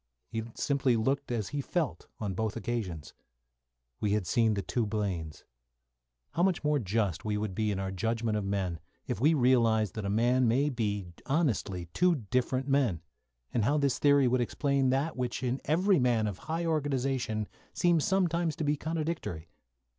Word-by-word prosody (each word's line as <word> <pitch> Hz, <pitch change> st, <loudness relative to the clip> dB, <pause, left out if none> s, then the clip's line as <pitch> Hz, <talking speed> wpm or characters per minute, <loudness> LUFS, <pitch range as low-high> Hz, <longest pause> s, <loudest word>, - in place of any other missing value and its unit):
He 115 Hz, -1 st, -2 dB
simply 135 Hz, -3 st, +1 dB
looked 135 Hz, +4 st, 0 dB
as 110 Hz, -5 st, -2 dB
he 145 Hz, -1 st, -2 dB
felt 160 Hz, 0 st, -2 dB
on 105 Hz, -3 st, -2 dB
both 110 Hz, +2 st, -2 dB
occasions. 95 Hz, -11 st, -4 dB, 0.9 s
We 105 Hz, -1 st, +1 dB
had 105 Hz, -3 st, 0 dB
seen 110 Hz, +2 st, +2 dB
the 100 Hz, -, -2 dB
two 120 Hz, -3 st, -1 dB
Blaines. 95 Hz, -8 st, -3 dB, 0.9 s
How 170 Hz, -, -1 dB
much 180 Hz, -2 st, +2 dB
more 150 Hz, -1 st, +2 dB
just 100 Hz, -, -1 dB
we 105 Hz, -1 st, -1 dB
would 105 Hz, -2 st, -2 dB
be 110 Hz, +2 st, 0 dB
in 100 Hz, -, -1 dB
our 95 Hz, 0 st, -2 dB
judgment 115 Hz, +3 st, -1 dB
of 105 Hz, -, -1 dB
men 95 Hz, -4 st, -2 dB, 0.3 s
if 105 Hz, -, -3 dB
we 155 Hz, +4 st, +5 dB
realised 115 Hz, -, +3 dB
that 110 Hz, -, -4 dB
a 100 Hz, -, -2 dB
man 120 Hz, +4 st, +3 dB
may 135 Hz, +6 st, +3 dB
be 105 Hz, -7 st, -2 dB
honestly 120 Hz, -, 0 dB
two 180 Hz, -1 st, +3 dB, 0.2 s
different 130 Hz, +1 st, +1 dB
men, 130 Hz, -, +1 dB, 0.5 s
and 115 Hz, -, +2 dB
how 140 Hz, +7 st, +2 dB
this 140 Hz, -3 st, +1 dB
theory 140 Hz, -2 st, +5 dB
would 125 Hz, 0 st, +2 dB
explain 140 Hz, +2 st, +1 dB
that 140 Hz, +5 st, 0 dB
which 125 Hz, 0 st, -3 dB
in 125 Hz, +1 st, -1 dB
every 180 Hz, +4 st, +3 dB
man 120 Hz, -3 st, +2 dB
of 100 Hz, -3 st, -3 dB
high 165 Hz, +2 st, -1 dB
organisation 135 Hz, -8 st, 0 dB, 0.2 s
seems 175 Hz, -3 st, +2 dB
sometimes 170 Hz, -4 st, +1 dB
to -, -, -3 dB
be 145 Hz, 0 st, +2 dB
contradictory! 155 Hz, -, -3 dB
120 Hz, 175 wpm, -30 LUFS, 105-145 Hz, 0.9 s, we